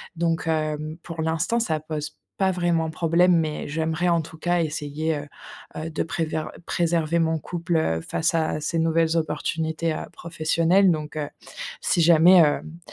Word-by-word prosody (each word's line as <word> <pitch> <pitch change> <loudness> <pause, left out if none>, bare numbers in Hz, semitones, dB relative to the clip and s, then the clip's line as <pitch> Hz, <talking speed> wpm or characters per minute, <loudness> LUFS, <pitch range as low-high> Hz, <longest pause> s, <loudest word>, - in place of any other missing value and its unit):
donc 165 -1 -1
hem, 155 0 -2
pour 165 -2 -6
l'instant, 160 +9 0
ça 160 -9 0
pose 150 -1 -5 0.2
pas 190 -1 +2
vraiment 170 -3 0
problème 170 +2 +3
mais 155 -2 -2
j'aimerais 160 +3 -1
en 170 -1 +3
tout 160 +1 -11
cas 175 +1 +1
essayer, 155 0 -2
heu, 145 0 -7 0.5
heu, 160 +1 -4
de - - -1
préver 160 -1 -2 0.2
de - - -14
préserver 170 -1 +1
mon 160 0 +1
couple, 175 +2 -3
heu, 80 - +1
face 165 - -1
à 155 -1 0
ces 165 +2 -1
nouvelles 165 0 +2
opportunités, 160 0 -1
heu, - - -5
professionnelles 170 +3 +2
donc 155 -1 -4
heu, 145 -1 -2 0.5
si - - +1
jamais, 170 +2 +7
hem, 160 +1 +1
160 Hz, 165 wpm, -24 LUFS, 155-170 Hz, 0.5 s, jamais